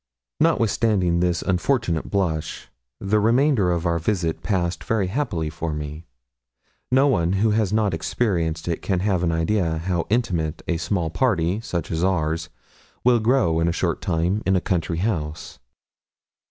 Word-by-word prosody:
Notwithstanding 100 -6 +2
this 90 -1 0
unfortunate 95 - 0
blush, 85 -6 -2 0.3
the 100 +2 +1
remainder 115 -2 +3
of 85 0 -1
our 85 0 +1
visit 85 -2 -1
passed 90 -4 -1
very 110 -4 0
happily 90 - -2
for 80 0 -4
me. 75 +2 -6 0.8
No 135 +2 +5
one 90 -10 +2
who 105 +3 +2
has 105 -2 +1
not 105 -3 +1
experienced 80 -2 -1
it 85 - -2
can 95 -3 -1
have 95 -3 +1
an 85 -2 +1
idea 80 0 0
how 85 +1 -2
intimate 90 -9 -1
a 85 - 0
small 85 -2 -1
party, 95 -4 +1
such 85 -7 -4
as 80 +1 -1
ours, 85 -2 0 0.5
will 125 -1 +4
grow 110 -8 +2
in 85 - +2
a - - +2
short - - -1
time 90 +4 0
in 95 - +2
a - - +3
country 85 -2 -1
house. 80 -6 -3
90 Hz, 155 wpm, -23 LUFS, 80-105 Hz, 0.8 s, No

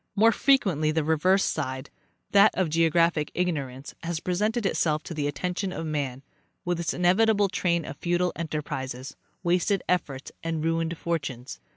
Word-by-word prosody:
More 225 +2 +6
frequently 200 - +2
the 160 0 0
reverse 180 +5 +3
side, 130 -2 -3 0.4
that 200 +1 +7
of 180 -5 0
geographic 165 -1 +2
ignorance, 140 -7 -2
has 165 -1 -3
presented 210 +6 -1
itself 155 -5 +1
to - - -7
the 150 -2 -1
attention 180 +6 -2
of 165 - -4
man, 140 -4 -3 0.4
with 175 -1 -1
its 170 0 -1
inevitable 200 +3 +3
train 170 -3 0
of - - -7
futile 175 +2 0
enterprises, 135 -5 -4 0.3
wasted 180 +2 +1
efforts 145 -7 -1
and 165 -1 -2
ruined 165 0 0
fortunes. 140 -8 -4
165 Hz, 150 wpm, -26 LUFS, 150-180 Hz, 0.4 s, that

